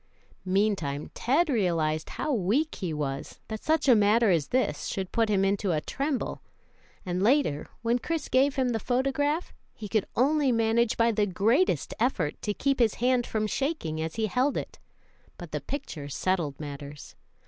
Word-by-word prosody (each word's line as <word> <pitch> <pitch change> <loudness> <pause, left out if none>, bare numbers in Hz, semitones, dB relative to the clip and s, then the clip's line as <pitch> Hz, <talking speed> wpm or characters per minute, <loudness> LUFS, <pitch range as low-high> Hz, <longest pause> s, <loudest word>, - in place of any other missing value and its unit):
Meantime, 185 -7 0
Ted 295 +8 +2
realized 165 - 0
how 300 - -1
weak 245 - +1
he 180 -4 -4
was, 145 -1 -4
that 220 -1 -5
such 315 -2 +1
a 255 - +8
matter 215 0 +4
as 160 -5 +1
this 245 - 0
should 190 -2 -4
put 225 -1 +1
him 195 -2 +2
into 195 -1 +1
a 155 - +1
tremble; 275 - -3 0.6
and 180 0 -2
later, 230 - +2 0.2
when 235 +2 +2
Chris 325 +3 -3
gave 265 +2 +3
him 260 -2 +1
the 225 -2 -1
photograph, 275 - 0 0.2
he 210 - -7
could 210 -1 0
only 280 +2 +3
manage 230 0 +2
by 230 0 +4
the 210 -2 +1
greatest 225 - +1
effort 205 - 0
to 210 - -1
keep 275 +6 0
his 230 -4 +3
hand 250 0 +1
from 215 -1 -1
shaking 215 - -2
as 160 0 -4
he 225 -1 0
held 255 +7 +1
it, - - -6 0.6
but 175 -3 -9
the 150 - -3
picture 155 - -6
settled 160 -3 -1
matters. 145 -1 -8
220 Hz, 170 wpm, -27 LUFS, 175-260 Hz, 0.6 s, a